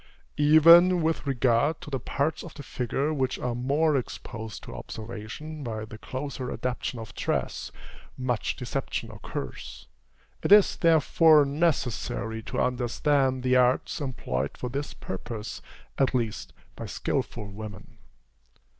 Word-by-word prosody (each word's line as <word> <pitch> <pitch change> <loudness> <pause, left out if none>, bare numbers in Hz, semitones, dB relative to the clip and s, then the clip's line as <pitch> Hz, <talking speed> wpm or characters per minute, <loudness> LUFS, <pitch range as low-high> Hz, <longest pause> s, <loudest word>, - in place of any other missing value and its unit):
Even 165 +4 +7
with 160 -2 0
regard 130 +3 +2
to 150 - -9
the 135 - -1
parts 140 +6 -1
of 170 - -10
the 145 - -8
figure 135 +4 -1
which 135 -3 0
are 125 - -2
more 140 +6 +1
exposed 110 -3 -5
to - - -9
observation 120 +8 -7
by 110 -3 -4
the 110 0 -11
closer 130 -1 -5
adaptation 125 0 -3
of 110 -2 -8
dress, - - -2 0.5
much 125 -4 -1
deception - - -4
occurs. - - -7 0.5
It - - -2
is, 205 -1 +7
therefore, 160 -2 +5
necessary 140 - -1
to - - -4
understand 130 +2 +1
the 130 0 +4
arts 125 +5 +2
employed 70 - -3
for 125 - -4
this 140 +3 -4
purpose, 105 +3 -6 0.4
at 135 -1 +2
least 115 -4 -2 0.2
by - - -6
skilful 110 -3 -2
women. 105 -1 -9
130 Hz, 130 wpm, -27 LUFS, 115-150 Hz, 0.5 s, Even